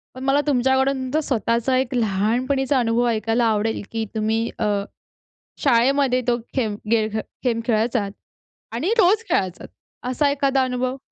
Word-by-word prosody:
पण 255 - -7
मला 275 +2 +3
तुमच्याकडून 265 0 +2
तुमचा 275 +5 0
स्वतःचा 235 +1 +1
एक 260 0 -1
लहानपणीचा 245 +6 +1
अनुभव 235 0 +1
ऐकायला 225 +1 +1
आवडेल 220 0 0
की 225 -1 -2
तुम्ही 220 +1 0
अ, 220 - 0 1.0
शाळेमध्ये 260 0 +3
तो 240 -1 +3 0.2
खेम 220 -6 0
गे 225 -2 +3 0.4
गेम 235 -2 +1
खेळायचात 225 -2 +1 0.6
आणि 245 - -1
रोज 415 +2 +4
खेळायचात 185 - -1 0.4
असा 285 +3 +2
एखादा 275 -1 +1
अनुभव? 255 0 -1
245 Hz, 135 wpm, -22 LUFS, 225-265 Hz, 1.0 s, रोज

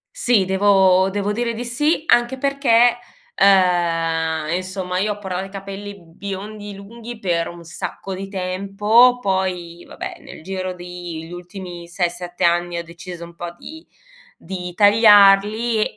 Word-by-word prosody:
Sì, 240 - +2
devo 190 -1 +4
devo 205 +1 -2
dire 235 +1 -2
di 240 +2 -5
sì, 295 +7 0
anche 240 +2 +3
perchè, 245 -3 +3 0.4
ehm, 165 -4 +2
insomma 185 0 -3
io 210 +2 0
ho - - -14
portato 190 -1 -4
i - - -11
capelli 200 +1 -8
biondi 200 +4 -7
lunghi 230 +4 -10
per 170 -4 -1
un 170 -1 -11
sacco 180 +3 -6
di 195 +1 -6
tempo, 200 +6 +3
poi 180 -4 -2
vabbè - - -7
nel - - -12
giro 185 0 -4
di 175 -2 -8
gli 170 - -11
ultimi 175 -1 -9
6-7 175 0 -3
anni 175 0 +1
ho 170 - -4
deciso 170 0 -9
un 170 0 -13
po' 175 0 -6
di 320 +1 -11 0.5
di 180 -1 -7
tagliarli 210 +1 +5
190 Hz, 145 wpm, -20 LUFS, 175-210 Hz, 0.5 s, tagliarli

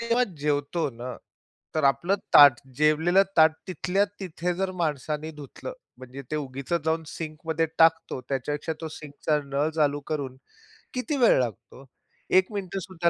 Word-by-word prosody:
जेव्हा 235 +2 +2
जेवतो 145 +2 0
न, 125 +1 -7 0.6
तर 155 -2 +1
आपलं 170 +8 +3 0.2
ताट, 140 -4 +9 0.2
जेवलेलं 160 +6 +4
ताट 160 0 +7 0.2
तिथल्या 185 +3 +1 0.2
तिथे 180 -1 -3
जर 190 +1 -1
माणसाने 150 0 -2
धुतलं, 150 - -8 0.3
म्हणजे 130 +2 -9
ते 155 - -1
उगीचच 140 +3 -3
जाऊन 160 0 +1
सिंकमध्ये 160 0 -3
टाकतो, 165 -4 +3
त्याच्यापेक्षा 145 +4 -2
तो 160 - -4
सिंकचा 150 0 -2
नळ 140 +2 0
चालू 145 -2 +2
करून 135 -4 -3 0.6
किती 280 +4 -1
वेळ 240 - +5
लागतो? 125 +3 -5 0.4
1 185 +3 +4
मिनिटसुद्धा 185 -3 -2
155 Hz, 140 wpm, -26 LUFS, 140-175 Hz, 0.6 s, ताट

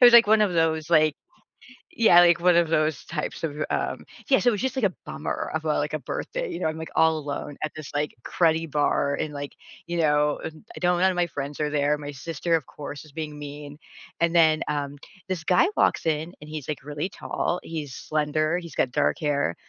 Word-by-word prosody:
was, 240 - +9
like, 235 -1 +9
one 215 +1 +5
of 205 -3 +3
those, 160 -2 +1
like 155 -1 +4 0.8
yeah, 215 -6 +7
like, 175 -1 +5
one 175 0 +4
of 170 -1 +3
those 155 -2 +1
types 160 -1 -4
of, 160 -3 -1 0.2
um - - -2 0.2
Yeah, 265 - +5
so 245 - +4
it - - +2
was 205 - -2
just, 260 0 -1
like, 260 -5 +1
a 185 - 0
bummer - - -4
of, - - -2
uh, - - +1
like - - -2
a - - -1
birthday, - - -4
you 340 - -5
know, - - -2
I'm, 155 0 -3
like, 160 - -6
all 160 -1 +4
alone 145 0 -5
at 155 - -1
this, 155 -2 -8
like, 145 +1 -1
cruddy 165 -1 +1
bar 145 -1 +1
and, 155 - -3
like, 145 0 -5 0.3
you 170 0 -3
know, 150 -2 +2
and 160 +4 -8
I - - -7
do 175 - +1
none 180 +1 +3
of - - -5
my 175 -1 +1
friends 145 -2 -5
are 150 -1 0
there, 145 0 +2
my 145 -1 -6
sister 165 +4 -1
of 160 -5 -1
course 145 +2 -8
is 155 - -16
being 150 0 -6
mean 145 0 -8 0.4
and 170 0 +2
then, 160 -2 +5
um, 145 -1 -2 0.3
this 180 -4 -2
guy 180 - +4
walks - - +2
in 160 +2 -1
and 150 - -10
he's, 155 -3 -6
like, 150 -3 -4
really 150 +5 -4
tall, 180 - -2
he's 150 -5 -5
slender, 155 +3 0
he's 170 -2 -8
got 125 - +1
dark - - +1
hair, 145 - 0
155 Hz, 230 wpm, -25 LUFS, 150-175 Hz, 0.8 s, was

